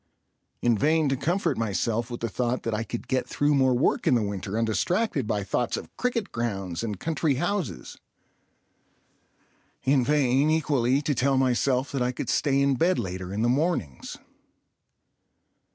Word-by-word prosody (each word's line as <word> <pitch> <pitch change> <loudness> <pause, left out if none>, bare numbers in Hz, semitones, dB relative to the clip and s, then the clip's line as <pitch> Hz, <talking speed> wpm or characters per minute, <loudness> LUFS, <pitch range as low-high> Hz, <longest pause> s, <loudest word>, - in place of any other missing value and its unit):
In 120 -1 +4
vain 155 +6 +2
to 135 - +1
comfort 165 +2 0
myself 115 +2 -1
with 120 - -6
the 115 - 0
thought 120 +3 -2
that 115 - -2
I 110 +1 -1
could 115 +2 -6
get 130 -1 0
through 145 +1 +1
more 130 -2 +3
work 130 +6 +1
in 135 - +5
the 115 - +2
winter 100 0 -4
undistracted 125 - 0
by 105 -2 -1
thoughts 115 +5 -1
of - - -9
cricket 240 -4 -2
grounds 95 -7 -3
and 105 -5 -4
country 160 -3 0
houses. 175 +4 -3 1.8
In 135 -1 +3
vain, 140 0 +2
equally, 140 -4 +1
to 145 - +1
tell 135 +1 +1
myself 130 +1 +1
that 135 - -2
I 125 0 +1
could 125 - -5
stay 140 -1 +2
in 140 -2 +2
bed 175 +6 +2
later 95 0 -4
in 105 +3 -1
the - - +3
mornings. 125 - -1
125 Hz, 165 wpm, -26 LUFS, 115-145 Hz, 1.8 s, in